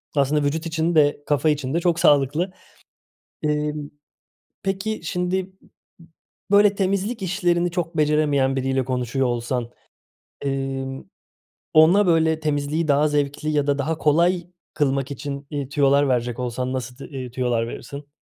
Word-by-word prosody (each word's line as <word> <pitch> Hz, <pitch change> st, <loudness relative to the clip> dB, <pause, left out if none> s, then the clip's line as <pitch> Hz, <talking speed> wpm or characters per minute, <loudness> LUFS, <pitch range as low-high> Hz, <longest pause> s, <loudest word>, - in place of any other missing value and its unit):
aslında 145 Hz, +1 st, +2 dB
vücut 155 Hz, +4 st, -1 dB
için 165 Hz, +1 st, -1 dB
de 145 Hz, -1 st, +3 dB
kafa 150 Hz, +1 st, +2 dB
için 145 Hz, -2 st, -1 dB
de 170 Hz, -, +2 dB
çok 175 Hz, -1 st, +1 dB
sağlıklı. 150 Hz, +3 st, +3 dB, 0.9 s
Imm, 150 Hz, -1 st, -1 dB, 0.7 s
peki 195 Hz, +3 st, -2 dB
şimdi, 180 Hz, +2 st, -2 dB, 1.0 s
böyle, 205 Hz, 0 st, +5 dB
temizlik 200 Hz, +3 st, -1 dB
işlerini 175 Hz, -2 st, +1 dB
çok 170 Hz, -1 st, -3 dB
beceremeyen 145 Hz, -3 st, +2 dB
biriyle 130 Hz, 0 st, 0 dB
konuşuyor 130 Hz, +1 st, -1 dB
olsan, 120 Hz, 0 st, -2 dB, 0.8 s
ımm, 135 Hz, -3 st, -3 dB, 0.6 s
ona, 175 Hz, +6 st, +6 dB
böyle, 160 Hz, -2 st, +3 dB
temizliği 150 Hz, +1 st, -1 dB
daha 145 Hz, +1 st, +3 dB
zevkli 145 Hz, +1 st, -1 dB
ya 145 Hz, -2 st, +1 dB
da 140 Hz, -1 st, +2 dB
daha 155 Hz, +3 st, -1 dB
kolay 170 Hz, +3 st, +2 dB, 0.3 s
kılmak 140 Hz, -1 st, 0 dB
için, 140 Hz, 0 st, -6 dB
ııı, 140 Hz, -2 st, -3 dB
tüyolar 140 Hz, 0 st, +3 dB
verecek 120 Hz, -1 st, -1 dB
olsan 125 Hz, +1 st, -3 dB
nasıl 125 Hz, -1 st, -4 dB
t 140 Hz, -, -10 dB
eee, 130 Hz, -3 st, -6 dB
tüyolar 120 Hz, -2 st, 0 dB
verirsin? 140 Hz, +5 st, -8 dB
145 Hz, 135 wpm, -23 LUFS, 135-165 Hz, 1.0 s, ona